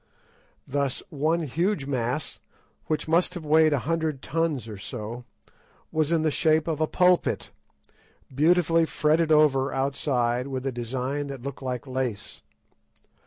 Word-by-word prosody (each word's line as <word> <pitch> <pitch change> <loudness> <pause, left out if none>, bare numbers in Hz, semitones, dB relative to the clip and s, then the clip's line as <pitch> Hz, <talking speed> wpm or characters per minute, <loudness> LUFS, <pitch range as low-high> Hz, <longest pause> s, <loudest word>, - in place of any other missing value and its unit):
Thus, 140 -1 -1
one 160 +4 +1
huge 165 +2 -1
mass, 130 +1 -2 0.5
which 155 0 -1
must 170 +3 +2
have 170 -3 -6
weighed 155 +1 +5
a 145 - +2
hundred 160 -3 -1
tons 155 -6 -1
or 105 -2 -7
so, 120 +2 -6 0.7
was 155 0 0
in 165 -2 +2
the 155 - +2
shape 155 +1 +2
of 160 -1 -1
a 155 - +2
pulpit, 180 +1 +2 0.8
beautifully 165 +2 +3
fretted 160 +1 +2
over 145 -3 +4
outside 130 -2 0
with 130 -1 -4
a 135 - 0
design 130 +4 -3
that 135 -3 -7
looked 140 0 -6
like 130 -1 -4
lace. 130 -5 -4
145 Hz, 140 wpm, -26 LUFS, 130-160 Hz, 0.8 s, weighed